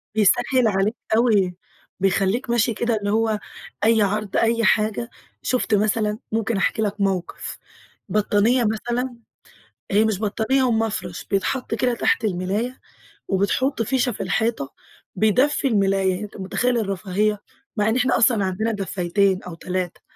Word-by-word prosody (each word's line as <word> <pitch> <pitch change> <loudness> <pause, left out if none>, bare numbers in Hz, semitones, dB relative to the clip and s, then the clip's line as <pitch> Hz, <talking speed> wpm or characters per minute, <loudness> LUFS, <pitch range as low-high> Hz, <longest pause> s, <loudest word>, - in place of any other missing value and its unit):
بيسَهِّل 230 +4 +3
عليك 205 +2 +1 0.2
أوي، 205 -7 +3 0.4
بيخليك 195 +6 +1
ماشي 235 -1 +2
كده 235 +1 0
اللي 205 -1 -2
هو 220 -1 +1 0.4
أي 225 0 +4
عرض، 205 0 0
أي 230 0 +2
حاجة 215 +2 +1 0.3
شُفت 250 -3 0
مثلًا، 210 +1 0
ممكن 225 0 0
أحكي 195 +3 0
لك 205 -1 -2
موقف 190 -3 -2 0.5
بطانية 215 +4 +2
مثلًا، 240 +4 -2 0.8
هي 210 +2 +4
مش 215 -3 0
بطانية 220 +5 +1
هُو 255 - +2
مفرش 200 -6 -2
بيتحط 225 +5 -1
كده 245 +2 +1
تحت 235 - +1
الملاية 205 +6 -2 0.5
وبتحُط 205 +7 0
فيشة 245 +2 +1
في 205 - -5
الحيطة، 225 - -1 0.5
بيدفي 250 +8 +2
الملاية، 195 -3 +1
أنت 210 - -9
مُتخيل 240 +6 0
الرفاهية؟ 205 0 -1 0.4
مع 210 +1 +2
إن 220 - +1
إحنا 250 0 +2
أصلًا 225 -5 +3
عندنا 205 +5 -1
دفّايتين 195 -1 0
أو 180 - -8
3، 180 0 -4
215 Hz, 135 wpm, -22 LUFS, 195-235 Hz, 0.8 s, أي